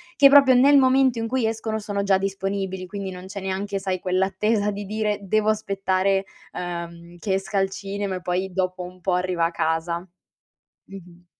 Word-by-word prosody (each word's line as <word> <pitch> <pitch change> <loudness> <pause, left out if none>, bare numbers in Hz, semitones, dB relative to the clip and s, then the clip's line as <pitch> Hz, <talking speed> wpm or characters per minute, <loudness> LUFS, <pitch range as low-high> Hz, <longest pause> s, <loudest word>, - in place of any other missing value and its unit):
che 275 +1 +7
proprio 275 -2 +7
nel 280 +3 +6
momento 260 -2 +3
in 225 - -2
cui 255 -1 0
escono 220 0 -2
sono 205 -1 -3
già 195 -1 +3
disponibili, 195 -1 -3
quindi 195 0 -5
non 180 0 -9
c'è 200 +1 -6
neanche 195 +1 -3
sai 190 -1 -2
quell' 185 +1 0
attesa 205 +2 0
di 205 +1 -5
dire: 210 0 -1
"Devo 215 +2 +1
aspettare, 195 -2 0 0.3
uhm, 170 -1 -6
che 190 +1 0
esca 195 +1 -1
al 195 - +1
cinema," 195 0 -4
e 180 - -6
poi 185 +1 -2
dopo 185 0 -2
un 180 +1 -10
po' 180 +1 -1
arriva 180 -2 0
a 170 - -1
casa. 165 +1 -1 0.9
Mh-mh. 180 -2 -13
195 Hz, 185 wpm, -23 LUFS, 185-210 Hz, 0.9 s, che